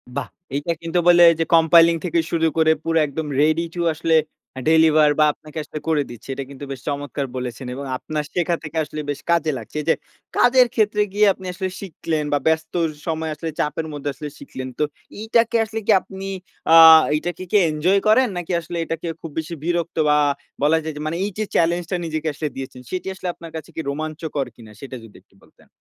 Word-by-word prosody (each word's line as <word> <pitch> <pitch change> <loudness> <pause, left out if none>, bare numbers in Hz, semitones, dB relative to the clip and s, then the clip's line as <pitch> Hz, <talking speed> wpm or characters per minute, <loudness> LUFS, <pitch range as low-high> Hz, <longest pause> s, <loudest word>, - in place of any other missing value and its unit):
বাহ! - - -2 0.3
এইটা 145 +4 -1
কিন্তু 165 +1 0
বলে 175 0 +7 0.2
যে 165 - +2
কম্পাইলিং 165 +1 +6
থেকে 170 -1 +1
শুরু 165 -1 +2
করে 160 0 +5
পুরো 165 0 0
একদম 150 +2 -4
রেডি 155 +2 +2
টু 175 - -2
আসলে 160 +1 +1 0.5
ডেলিভার 155 -2 +5
বা 155 - +6
আপনাকে 155 +1 -13
আসলে 155 - -7
করে 155 -3 +2
দিচ্ছে। 120 -2 -11
এটা 135 +1 -4
কিন্তু 140 0 -9
বেশ 135 -3 -6
চমৎকার 145 -1 -3
বলেছেন 125 0 -5
এবং 140 +1 -6
আপনার 150 +3 -4
শেখা 175 -1 +1
থেকে 160 +1 -6
আসলে 155 0 -6
বেশ 145 - -2
কাজে 165 -2 +2
লাগছে। 115 +3 -11
এই - - -9
যে - - +5 0.4
কাজের 250 0 +5
ক্ষেত্রে 210 -1 +2
গিয়ে 210 +1 +4
আপনি 190 - -13
আসলে 190 0 -3
শিখলেন 160 -4 -3
বা 145 - +3
ব্যস্ত 160 0 0 0.3
সময় 160 -1 -2
আসলে 160 +2 -5
চাপের 150 +2 -1
মধ্যে 145 0 -4
আসলে 145 +2 -7
শিখলেন। 130 0 -7
তো - - +3 0.4
এইটাকে 230 +2 +2
আসলে 225 +1 -5
কি - - +5
আপনি, 195 0 -8 0.5
আ - - +9 0.4
এইটাকে 175 +3 -3
কি - - +5
এনজয় 165 +6 +2
করেন, 250 +4 +5
নাকি 175 0 -4
আসলে 170 +1 -6
এটাকে 165 +1 -4
খুব 165 - -7
বেশি 160 +2 -5
বিরক্ত 170 0 -2
বা 150 - +4 0.5
বলা 155 +2 +4
যায় 160 -1 -4
যে - - -5
মানে 165 +2 -2
এই 205 - -3
যে 215 - 0
চ্যালেঞ্জটা 170 +2 +1
নিজেকে 155 0 -3
আসলে 150 +1 -3
দিয়েছেন, 130 -1 -7
সেটি 185 0 -4
আসলে 185 -1 -7
আপনার 165 -1 -11
কাছে 160 - -7
কি 160 - -2
রোমাঞ্চকর 155 -1 -3
কিনা? 110 -2 -14
সেটা 135 -1 -7
যদি 110 - -15
একটু - - -32
বলতেন। - - -24
160 Hz, 200 wpm, -21 LUFS, 150-175 Hz, 0.5 s, আ